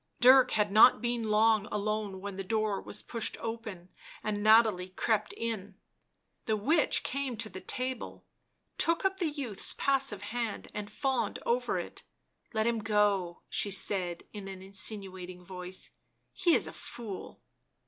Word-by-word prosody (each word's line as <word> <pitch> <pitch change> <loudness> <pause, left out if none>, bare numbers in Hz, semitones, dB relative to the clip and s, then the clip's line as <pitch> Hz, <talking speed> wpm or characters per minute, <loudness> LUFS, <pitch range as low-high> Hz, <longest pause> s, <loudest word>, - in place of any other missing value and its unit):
Dirk 255 +1 +8
had 210 -2 +2
not 220 +4 +8
been 235 -2 -1
long 215 0 +4
alone 210 -2 -2
when 200 0 -5
the 195 - -4
door 215 0 0
was 210 - -6
pushed 230 -2 -2
open 225 -6 -6 0.3
and 210 -1 -2
Nathalie 215 -4 +5
crept 210 +3 0
in. 210 -4 -4 0.7
The 220 -1 +1
witch 295 +9 +2
came 270 -3 -3
to 220 0 -2
the 190 -2 -8
table, 255 -1 -3 0.5
took 335 +3 +4
up 385 0 +2
the 350 -4 0
youth's 270 -9 -1
passive 270 -7 +1
hand 225 0 -4
and 210 -1 -5
fawned 265 +4 -1
over 480 +1 +1
it. - - -5 0.3
" - - -44
Let 220 0 +2
him 235 -1 +1
go," 205 -5 +1
she 205 - -1
said 185 -3 0
in 205 -2 -7
an 190 -1 -8
insinuating 190 -2 -3
voice. 180 0 -5 0.2
" - - -47
He 345 -2 +6
is - - +2
a - - -7
fool." 215 -6 -8
215 Hz, 160 wpm, -30 LUFS, 195-235 Hz, 0.7 s, Dirk